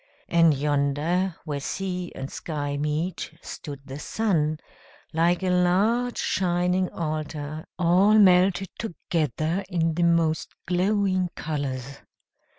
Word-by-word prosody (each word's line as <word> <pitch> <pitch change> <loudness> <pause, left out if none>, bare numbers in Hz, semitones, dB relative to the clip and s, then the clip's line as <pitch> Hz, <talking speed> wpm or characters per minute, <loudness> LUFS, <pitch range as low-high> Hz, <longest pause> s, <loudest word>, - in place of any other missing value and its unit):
And 165 -3 +5
yonder, 150 +6 0
where 145 -3 -3
sea 180 +3 -3
and 135 +1 -6
sky 145 -3 -3
meet, 155 +3 -2
stood 145 -4 -7
the 135 +1 -7
sun, 155 -6 0 0.5
like 170 +3 +2
a 185 - +1
large 200 +8 +2
shining 180 0 +1
altar, 155 -1 -4
all 185 +4 +4
melted 185 -1 +5
together 165 - -1
in 165 -2 +1
the 175 - -2
most 165 -2 +1
glowing 185 0 +1
colors. 140 -3 -4
170 Hz, 110 wpm, -25 LUFS, 150-185 Hz, 0.5 s, And